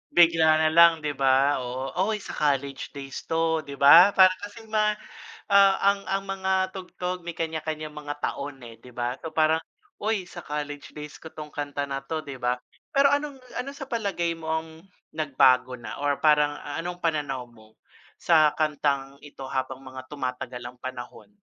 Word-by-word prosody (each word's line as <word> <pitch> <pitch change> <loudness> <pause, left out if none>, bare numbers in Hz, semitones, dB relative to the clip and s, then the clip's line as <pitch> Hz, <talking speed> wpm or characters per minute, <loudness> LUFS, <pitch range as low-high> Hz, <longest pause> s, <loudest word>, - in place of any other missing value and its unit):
Bigla 165 -2 +6
na 155 - +4
lang 165 -1 +6
'di 150 - 0
ba, 135 0 +3
oo. 130 +2 -4 0.2
"uy 215 -2 -2
sa - - -7
college 140 -1 -1
days 135 -1 -7
'to," 160 0 +1
'di 140 -2 -8
ba? 165 +8 +8
Parang 185 -1 +6
kasi 205 +2 -9
ma 215 -1 +1 0.6
ah, 195 -1 +7
ang 200 0 +4
ang 195 0 -1
mga 190 -1 -1
tugtog 180 -2 -6
may 170 - -4
kanya-kanyang 155 -1 -4
mga 145 -1 -5
taon 140 0 -3
eh, 115 -1 -11
'di 125 - -15
ba. 125 +1 -2 0.2
Parang, 160 0 +3 0.4
"Uy 210 -2 0
sa 175 - -10
college 145 -1 -5
days 150 0 -9
ko 160 - -10
'tong 155 -1 -9
kanta 145 -1 -3
na 135 -1 -3
'to," 155 +3 -5
'di 140 -3 -8
ba? 125 0 +1 0.4
Pero 275 0 +5
anong 285 -1 -1 0.2
ano, 275 - -4
sa 280 - -7
palagay 195 -7 -1
mo 160 - -8
ang 160 0 -1 0.4
nagbago 130 -4 +3
na 120 -1 -8
or 145 -1 0
parang 150 -1 +4 0.2
anong 175 +1 -6
pananaw 145 -6 -1
mo 110 -2 -20 0.4
sa 155 -3 +4
kantang 140 -3 -1
ito 140 -2 -11
habang 130 0 -3
mga 130 0 -10
tumatagal 125 -3 -5
ang 125 - -24
panahon? 130 +5 -8
150 Hz, 175 wpm, -26 LUFS, 135-175 Hz, 0.6 s, ba